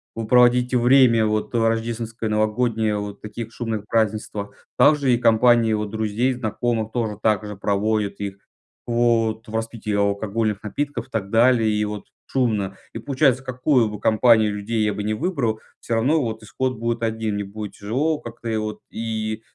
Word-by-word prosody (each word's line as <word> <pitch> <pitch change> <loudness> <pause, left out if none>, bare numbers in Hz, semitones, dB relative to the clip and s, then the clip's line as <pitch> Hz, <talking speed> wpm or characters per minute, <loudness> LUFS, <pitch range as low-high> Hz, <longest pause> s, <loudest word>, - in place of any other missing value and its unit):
вы 115 -1 -4
проводите 125 +1 +4
время 120 -2 +5
вот 110 +2 -1
рождественское 115 0 -1
новогоднее, 110 0 0
вот 105 0 -7
таких 110 +2 -7
шумных 110 -2 -4
празднествах. 110 -2 -2
Также 145 -4 +4
и - - +3
компании 115 -1 +4
вот 105 -1 -2
друзей 110 +4 0
и - - -1
знакомых 115 -1 -2
тоже 110 -4 -2
так 105 -1 +1
же 105 0 -6
проводят 100 +1 -1
их 100 -1 -4 0.5
вот 115 -1 +1
в 110 - -7
распитии 115 -1 -3
алкогольных 100 +1 0
напитков, 120 +3 -4
и - - -32
так 100 -3 -3
далее, 115 0 +4
и 105 0 0
вот 105 -1 -5 0.2
шумно. 105 -7 0 0.2
И - - -5
получается 135 -2 +2
какую 130 -2 +1
бы 105 -1 -7
компанию 110 -1 +4
людей 110 +2 -2
я 105 -1 +1
бы 105 - -4
не 105 +1 -1
выбрал, 125 - -1 0.2
всё 115 - -2
равно 135 +8 +2
вот 110 -3 -4
исход 130 +3 -2
будет 115 +1 -2
один. 110 -2 -1
Мне 100 0 -3
будет 105 +1 -7
тяжело 140 +10 -1
как-то 115 -2 -8
и 110 - 0
вот, 110 0 -4
и 110 -1 -3
110 Hz, 170 wpm, -22 LUFS, 105-120 Hz, 0.5 s, время